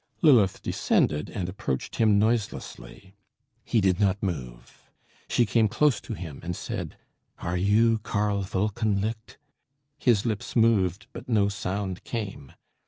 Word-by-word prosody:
Lilith 120 - +5
descended, 75 0 +1
and 90 -4 -4
approached 85 -9 -4
him 110 -3 +4
noiselessly. 105 -3 -2 0.5
He 115 - +1
did 95 -1 +2
not 100 0 +1
move. 65 -11 -6 0.4
She 120 - +3
came 110 +1 +3
close 145 +6 +2
to 115 - -6
him 80 -7 -8
and 90 0 -4
said - - -5 0.4
"Are 85 +1 -3
you 110 +5 +3
Karl 105 -1 -1
Wolkenlicht?" 105 +3 -2 0.6
His 115 -6 +3
lips 110 -3 -3
moved, 105 -6 +2
but 120 +1 -9
no 105 -4 +3
sound 95 -1 -4
came. 100 - -5
100 Hz, 130 wpm, -26 LUFS, 95-110 Hz, 0.6 s, Lilith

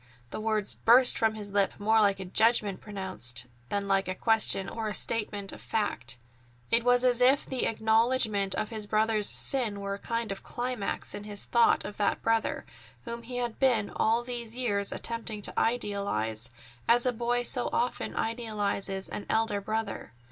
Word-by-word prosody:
The - - -5
words 215 -2 0
burst 245 +2 +5
from 220 -1 +1
his 205 -2 -7
lips 200 -1 +1
more 220 +2 +3
like 200 -2 +2
a 190 - -6
judgment 210 0 +2
pronounced 185 - -4 0.2
than 200 0 -2
like 195 -1 +1
a 185 - -3
question 220 -3 +2
or 225 +1 -4
a 210 - -2
statement 205 -3 +1
of - - -11
fact. 135 - -2 0.5
It 230 0 +4
was 245 0 +3
as 250 -1 +2
if 265 +3 +4
the 260 -2 -1
acknowledgment 220 -2 +1
of 215 - -2
his 215 -2 -4
brother's 215 0 +2
sin 235 -7 +4
were 200 0 -4
a 200 - -6
kind 230 -1 -3
of 195 - -6
climax 245 -4 -4
in 205 - -7
his 205 -1 -4
thought 235 -1 +3
of 205 - -7
that 205 -1 0
brother, 225 0 0 0.4
whom 235 0 -5
he 245 +1 -7
had 240 -2 -3
been 240 -6 +2
all 230 +2 +1
these 240 -2 -5
years 205 -5 0
attempting 230 -2 -3
to - - +1
idealize, 200 - -2 0.4
as 240 +1 +4
a 250 - +1
boy 240 +1 -1
so 245 0 +1
often 245 - -2
idealizes 205 -4 -2
an 205 - -7
elder 220 -2 0
brother. 220 - -4
220 Hz, 175 wpm, -28 LUFS, 200-235 Hz, 0.5 s, burst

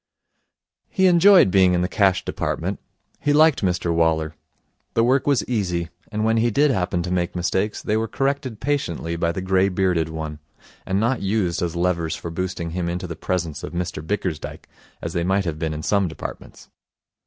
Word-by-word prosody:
He 190 - +2
enjoyed 180 - +6
being 95 -2 +5
in 90 - +1
the - - +1
Cash 95 -1 +2
Department. - - -2 0.4
He 145 - +1
liked 155 -1 +5
Mr 90 -2 0
Waller. 80 -1 +1 0.6
The 115 - +4
work 130 +4 +2
was 140 -4 +2
easy; 90 -8 -1 0.2
and 110 0 -1
when 110 0 +2
he 115 +1 +3
did 140 +6 +3
happen 90 -5 0
to 90 - -4
make 90 -1 -1
mistakes, 95 +4 -1
they 105 - 0
were 110 +1 0
corrected 135 -1 -2
patiently 90 - -2
by 85 0 0
the 95 - -4
grey 95 +1 +3
bearded 90 -4 +1
one, 80 -1 -5 0.5
and 95 +1 +1
not 120 +4 +1
used 100 -3 0
as 85 -1 -2
levers 85 -2 0
for 85 - -6
boosting 90 -1 -3
him 85 0 -2
into 90 +1 -3
the 85 -2 -6
presence 85 -3 -3
of - - -7
Mr 85 -3 -3
Bickersdyke, 90 -3 -4 0.4
as - - -4
they 85 - 0
might 95 +2 +1
have 80 -3 -3
been 80 -1 -1
in 75 0 -5
some 100 +1 +2
departments. 80 - -9
90 Hz, 190 wpm, -22 LUFS, 85-110 Hz, 0.6 s, enjoyed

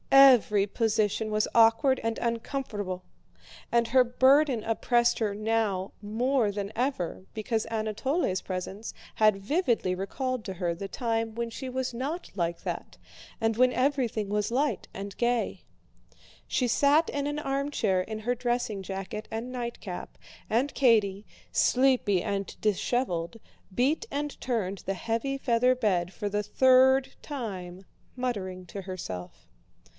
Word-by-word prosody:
Every 250 -7 +7
position 215 0 0
was 215 0 +1
awkward 230 +4 +5
and 225 0 -1
uncomfortable, 225 -6 -3 0.7
and 235 -1 +2
her 255 +1 +6
burden 260 0 +4
oppressed 240 +1 +2
her 210 -3 0
now 215 -3 0
more 225 +2 +1
than 200 0 -4
ever 235 -8 -2
because 220 0 -1
Anatole's 220 - -1
presence 190 +3 -5 0.2
had 215 -2 +4
vividly 240 - +1
recalled 250 +6 -3
to 190 - -4
her 175 -1 -1
the 195 +4 -6
time 225 0 -2
when 235 0 -3
she 260 +3 -6
was 255 0 -2
not 280 +9 -4
like 170 -2 -2
that - - -5 0.4
and 225 -1 +1
when 255 0 +5
everything 250 -6 0
was 210 +1 0
light 280 +5 0
and 200 0 -6
gay. 240 -1 0 0.8
She 250 - +1
sat 290 +6 +4
in 285 0 -2
an 290 0 -2
armchair 275 -9 0
in 215 +3 -5
her 240 +3 0
dressing 240 -4 -1
jacket 195 +3 -5
and 230 +3 -4
nightcap 235 -7 -6 0.3
and 250 +6 +1
Katie, 210 -6 +3 0.2
sleepy 250 -8 +3
and 200 -1 -2
disheveled, 210 -3 -1 0.4
beat 285 - +1
and 290 0 -4
turned 200 -6 -1
the 195 - -3
heavy 230 +7 -2
feather 250 -1 +3
bed 185 -8 0
for 205 +1 -4
the 210 +1 -1
third 260 +4 +4
time, 190 -9 -6 0.3
muttering 190 -8 -3
to 195 +3 -6
herself. 130 - -7
225 Hz, 135 wpm, -28 LUFS, 200-255 Hz, 0.8 s, Every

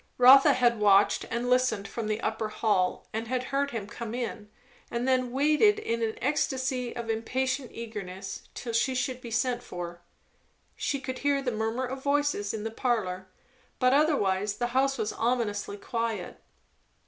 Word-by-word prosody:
Rotha 260 +2 +8
had 240 -3 +2
watched 205 -1 +4
and 235 +2 -2
listened 250 -5 +2
from 220 +2 -4
the 215 +1 -1
upper 220 0 -2
hall; 205 -4 0
had 225 +1 -3 0.2
heard 280 +2 -1
him 230 -6 -4
come 225 +2 -6
in, 230 -4 -4 0.4
and 235 +2 -2
then 255 -1 +3
had 245 - -8
waited 305 - +4
in 230 - -2
an 220 -1 -1
ecstasy 260 -3 -1
of 235 -1 -5
impatient 255 +4 -1
eagerness 195 -4 -6
till 235 - -5
she 260 +3 +1
should 255 0 -2
be 235 - -7
sent 240 +2 0
for. 175 -1 -7 0.7
She 280 - -1
could 260 -1 -5
hear 285 -1 +2
the 250 - 0
murmur 225 +3 -1
of 265 +1 -5
voices 285 -8 +1
in 215 -1 -5
the 225 - -3
parlour; 200 -7 -1 0.5
but 255 +1 +3
otherwise 205 -10 +2
the 240 +3 -1
house 270 +1 +2
was 210 - -2
ominously 225 -4 -1
quiet. 230 +1 -3
235 Hz, 165 wpm, -28 LUFS, 215-260 Hz, 0.7 s, Rotha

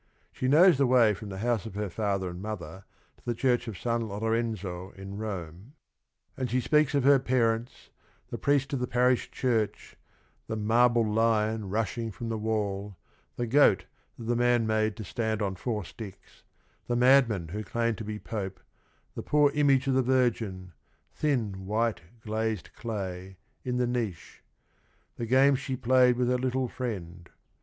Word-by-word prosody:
She 130 - -3
knows 160 +2 +6
the 135 - +4
way 120 -4 +5
from 105 +1 -8
the 95 - -6
house 115 -3 0
of 100 - -10
her 105 0 -2
father 100 -2 -1
and 90 +1 -7
mother 95 -4 -7 0.3
to - - -27
the 120 - -2
church 125 0 +1
of 110 -5 -5
San 115 0 -1
Lorenzo 105 -4 -2
in 95 +1 -8
Rome, 95 - -6 0.6
and 130 -2 -3
she 130 - +1
speaks 150 +2 +2
of 140 - +2
her 140 0 +6
parents, 120 -2 -1 0.4
the - - -5
priest 140 -1 +1
of 135 - 0
the 125 - -2
parish 125 +1 +2
church, 115 -5 -1 0.5
the 110 - -3
"marble 115 +2 +3
lion 110 -1 +1
rushing 115 +2 -2
from 115 +3 -6
the 110 - -2
wall," 105 -3 -2 0.4
the 120 - -2
goat 120 -5 +4 0.3
that - - -8
the 120 +1 0
man 120 -1 +3
made 110 -1 +1
to 110 - -7
stand 110 +1 -2
on 100 -3 -1
four 105 0 -3
sticks, 100 +1 -11 0.5
the 120 - 0
madman 120 -9 +4
who 105 +5 -4
claimed 115 +2 -1
to - - -4
be 105 0 -5
Pope, 100 -4 -5 0.5
the - - -5
poor 150 -1 +3
image 140 -2 +3
of 135 - +1
the 130 - +3
Virgin, 115 -8 0 0.2
" - - -42
thin 110 -10 -1
white 110 +1 0 0.2
glazed 110 -2 -3
clay," 95 -4 -5 0.3
in 125 -1 -2
the 125 - +2
niche; 115 -8 -4 0.8
the 115 - -4
games 135 +2 +4
she 130 -1 -3
played 125 0 +4
with 125 -1 +1
her 125 0 +1
little 130 0 0
friend. 90 -9 -6
115 Hz, 170 wpm, -28 LUFS, 105-125 Hz, 0.8 s, knows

